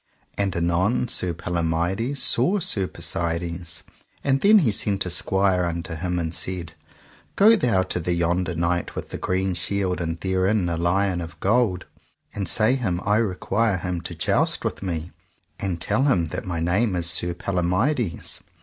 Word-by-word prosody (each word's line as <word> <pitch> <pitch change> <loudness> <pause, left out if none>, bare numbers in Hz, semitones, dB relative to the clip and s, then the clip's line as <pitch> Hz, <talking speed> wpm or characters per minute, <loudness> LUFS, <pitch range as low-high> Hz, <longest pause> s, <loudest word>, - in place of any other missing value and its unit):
And 100 -2 -1
anon 85 +8 +1
Sir 90 - +1
Palomides 85 - -1
saw 155 - +3
Sir 100 - -1
Persides, 85 0 -3 0.4
and 135 -1 +1
then 215 +2 +7
he 145 - +3
sent 100 -1 +1
a 90 - -3
squire 95 0 +2
unto 85 0 -4
him 90 +2 -2
and 80 -1 -2
said: 85 -2 -2 0.6
Go 220 +3 +7
thou 115 - +2
to 95 - -2
the 85 +1 -1
yonder 85 +1 0
knight 85 +1 -1
with - - -5
the - - -6
green 95 0 -1
shield 90 +1 -1
and 85 0 -3
therein 95 +1 +1
a 85 - -1
lion 90 +1 +1
of 80 -1 -8
gold, 100 -3 +1 0.5
and 100 -4 0
say 110 +3 +5
him 105 -10 -1
I 105 +1 +3
require 105 0 0
him 90 -1 -3
to - - -5
joust - - 0
with - - -3
me, 85 -3 -4 0.5
and 95 -4 -2
tell 130 - +1
him 95 -12 +2
that - - -4
my 85 -2 -2
name 90 +5 +1
is 85 -1 -1
Sir 85 0 +2
Palomides. 95 - -1
90 Hz, 170 wpm, -23 LUFS, 85-100 Hz, 0.6 s, then